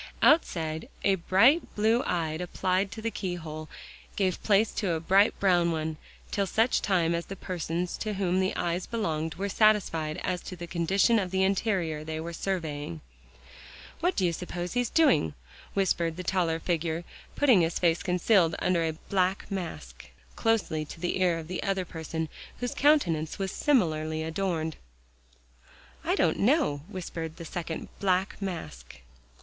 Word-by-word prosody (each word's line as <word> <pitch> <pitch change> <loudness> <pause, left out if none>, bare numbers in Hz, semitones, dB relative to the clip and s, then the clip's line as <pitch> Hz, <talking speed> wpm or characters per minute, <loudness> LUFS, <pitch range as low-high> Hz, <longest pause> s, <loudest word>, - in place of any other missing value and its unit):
Outside, 160 - +2
a 195 - +4
bright 210 - +3
blue 220 +3 +3
eye 165 -7 -1
applied 185 +3 -1
to 220 - -8
the 230 - -1
keyhole, 160 -6 -5 0.5
gave 185 -3 0
place 210 +1 +3
to 195 -6 -1
a 160 - -1
bright 195 +6 +3
brown 175 -3 +3
one, 160 -1 -2 0.3
till 200 -2 0
such 225 +6 +2
time 170 -4 +2
as 170 0 -2
the 195 - -6
persons 175 -1 -3
to 215 -2 -3
whom 185 -1 +1
the 190 0 0
eyes 175 +1 -1
belonged, 160 -9 -2
were 200 +2 -2
satisfied 195 -7 +2
as 180 -2 -1
to 185 - -7
the 175 0 -7
condition 190 +7 +2
of 190 -3 -2
the 190 +1 +1
interior 190 -6 0
they 160 0 -4
were 170 +1 -5
surveying. 155 - -3 1.0
"What 355 +3 +1
do 190 - +2
you 170 - +1
suppose 175 +1 -5
he's 245 -1 0
doing?" 265 - +3 0.4
whispered 170 -4 +1
the 185 - -4
taller 170 -3 +1
figure, 165 -1 -1 0.3
putting 255 -10 +5
his 165 0 0
face 170 -2 +2
concealed 180 -2 +3
under 175 -2 +1
a 160 -1 0
black 190 +1 0
mask, 185 -4 -6 0.3
closely 220 -9 +1
to 155 - -10
the 180 +2 -1
ear 175 -2 +3
of 160 -1 -7
the 185 - -3
other 195 -2 -1
person, 160 -1 -4 0.3
whose 245 0 -2
countenance 170 - +2
was 195 -2 -2
similarly 160 - +1
adorned. 160 -1 -2 1.4
"Don't - - +2
know," 225 - +2
whispered 165 -5 -6
the 170 - -8
second 165 0 -5
black 190 +1 0
mask. 160 - -6
180 Hz, 155 wpm, -28 LUFS, 160-195 Hz, 1.4 s, putting